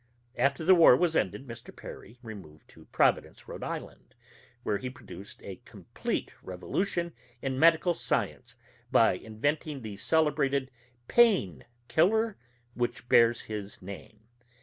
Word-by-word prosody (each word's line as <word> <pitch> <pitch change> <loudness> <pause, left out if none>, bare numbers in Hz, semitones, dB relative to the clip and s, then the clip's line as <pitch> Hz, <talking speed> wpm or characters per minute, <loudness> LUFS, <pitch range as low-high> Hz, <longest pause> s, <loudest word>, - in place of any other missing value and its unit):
After 140 +4 +1
the 190 - +8
war 165 -8 +8
was 170 -2 +1
ended, 140 - 0
Mr. 120 -2 -10
Perry 115 - -11
removed 95 -9 -11
to - - -17
Providence, - - +1
Rhode - - -7
Island, - - -7 0.5
where 100 -2 0
he 130 - -4
produced 120 -7 -11
a 95 -2 -8
complete - - -4
revolution 170 - -2 0.3
in 135 -1 -2
medical 165 +2 +5
science - - -2 0.4
by - - +5
inventing 145 +5 -3
the 105 -2 -7
celebrated 140 -1 +1 0.4
"Pain 185 - +3 0.2
Killer" 215 +8 +2 0.4
which 120 0 -3
bears 115 0 +5
his 105 -2 -6
name. 100 +3 -10
130 Hz, 125 wpm, -29 LUFS, 110-160 Hz, 0.5 s, the